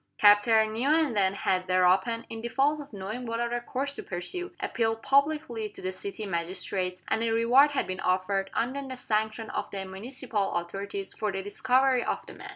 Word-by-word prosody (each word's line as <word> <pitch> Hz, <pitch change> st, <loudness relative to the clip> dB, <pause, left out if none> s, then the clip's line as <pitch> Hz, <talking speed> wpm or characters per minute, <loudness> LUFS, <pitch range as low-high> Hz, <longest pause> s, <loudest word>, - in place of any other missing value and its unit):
Captain 215 Hz, +1 st, +5 dB
Newenden 240 Hz, -6 st, +2 dB
had 185 Hz, -2 st, 0 dB
thereupon, 185 Hz, +6 st, +3 dB
in 225 Hz, 0 st, -7 dB
default 275 Hz, +6 st, +1 dB
of 285 Hz, -, -12 dB
knowing 210 Hz, +4 st, -5 dB
what 230 Hz, 0 st, -2 dB
other 240 Hz, 0 st, -1 dB
course 270 Hz, +3 st, -3 dB
to -, -, -6 dB
pursue, 275 Hz, -, -5 dB
appealed 225 Hz, -1 st, -1 dB
publicly 280 Hz, -6 st, +1 dB
to -, -, -14 dB
the 185 Hz, -, -3 dB
city 200 Hz, +3 st, -5 dB
magistrates, 180 Hz, 0 st, -2 dB
and -, -, 0 dB
a 230 Hz, -, +1 dB
reward 235 Hz, +6 st, +5 dB
had -, -, 0 dB
been 185 Hz, 0 st, -5 dB
offered, 195 Hz, +1 st, 0 dB
under 260 Hz, +4 st, -1 dB
the 260 Hz, -, -5 dB
sanction 220 Hz, -1 st, -1 dB
of -, -, -3 dB
the 195 Hz, -1 st, -5 dB
municipal 210 Hz, +1 st, -3 dB
authorities, 195 Hz, +3 st, -4 dB
for 210 Hz, -1 st, -2 dB
the 195 Hz, 0 st, -4 dB
discovery 255 Hz, +5 st, +2 dB
of -, -, -2 dB
the -, -, -11 dB
man. -, -, -10 dB
220 Hz, 180 wpm, -28 LUFS, 195-250 Hz, -, Captain